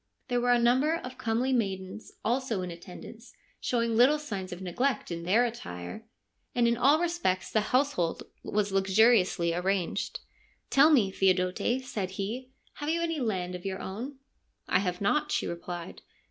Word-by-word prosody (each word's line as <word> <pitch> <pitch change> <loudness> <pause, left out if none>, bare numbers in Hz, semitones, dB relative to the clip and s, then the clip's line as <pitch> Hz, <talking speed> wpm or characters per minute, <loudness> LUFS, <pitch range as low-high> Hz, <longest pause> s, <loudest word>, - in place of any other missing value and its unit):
There 245 -1 +1
were 245 0 +3
a 245 - +6
number 255 +7 +3
of 255 -5 -7
comely 245 +2 0
maidens 195 -3 -2
also 235 -4 0
in 180 - -5
attend 170 +1 -10
ance, 230 - -13 0.3
showing 235 -2 0
little 255 +6 +6
signs 200 -11 -5
of 180 - -6
neglect 190 +7 -1
in 170 0 -3
their 220 +7 +4
attire, 220 - -6 0.5
and 240 -1 +3
in 235 - +3
all 275 +6 +4
respects 340 - -1
the 215 - +3
household 255 - +1 0.2
was 205 -1 -1
luxuriously 195 -3 +3
arranged. 180 0 -1 0.3
' - - -38
Tell 280 +3 +7
me, 235 -11 +4
Theodote,' 190 +7 +1
said 200 -7 -4
he, 235 +6 -4
' - - -35
have 295 0 -3
you 335 +1 +1
any 330 -2 -1
land 185 -7 -2
of 180 -1 -7
your 190 -1 -3
own? 235 +9 -6 0.2
' - - -45
' - - -52
I 185 - +3
have 180 -1 -2
not,' 300 +9 +1
she - - 0
replied. 170 0 -6
220 Hz, 180 wpm, -29 LUFS, 185-255 Hz, 0.5 s, Tell